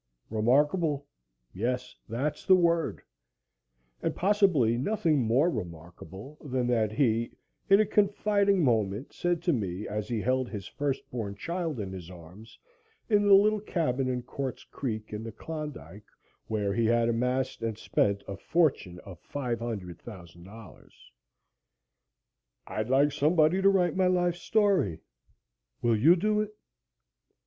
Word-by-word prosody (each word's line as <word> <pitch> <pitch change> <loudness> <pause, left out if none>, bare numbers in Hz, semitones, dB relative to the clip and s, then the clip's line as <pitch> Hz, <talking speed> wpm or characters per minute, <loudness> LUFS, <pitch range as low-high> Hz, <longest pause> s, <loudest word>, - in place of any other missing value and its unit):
Remarkable? 145 +6 +2 0.5
Yes 125 +5 -3
that's 130 +7 -2
the 190 - +6
word 170 -2 +1 1.0
and - - -1
possibly 185 - +3
nothing 160 - +1
more 125 +7 +3
remarkable 90 - -8
than 130 -4 -1
that 110 -3 +1
he, 115 -1 +1 0.4
in 195 +1 +7
a 215 - +4
confiding 200 -2 +2
moment 110 -1 0
said 175 -1 -1
to 175 - +2
me 100 -4 -3
as 105 0 -4
he 120 -3 -2
held 130 +2 0
his 100 -4 -6
first 140 -2 -3
born 105 -5 -4
child 165 - -3
in 100 -2 -4
his 90 -3 -8
arms 90 +5 -13 0.5
in 205 -1 +3
the 200 - +8
little 210 +2 +4
cabin 140 -10 -1
on 125 -1 -2
Quartz 130 0 -5
Creek, 110 -5 -5
in 105 - -4
the 115 - -6
Klondike, 145 -6 -8 0.4
where 105 -2 -1
he 115 +1 +1
had 115 0 +3
amassed 125 +3 -1
and 115 -2 -3
spent 100 -2 0
a 100 - -5
fortune 130 - 0
of 90 -3 -12
$500,000: 105 - -7 1.8
"I'd 110 +2 -4
like 140 +3 +4
somebody 155 +5 +3
to 195 - +6
write 180 -4 +2
my 185 -1 +3
life 175 -1 +2
story. 190 - +1 0.8
Will 120 -1 +3
you 150 +11 +6
do 210 +3 +1
it?" 215 0 -5
125 Hz, 135 wpm, -28 LUFS, 110-170 Hz, 1.8 s, the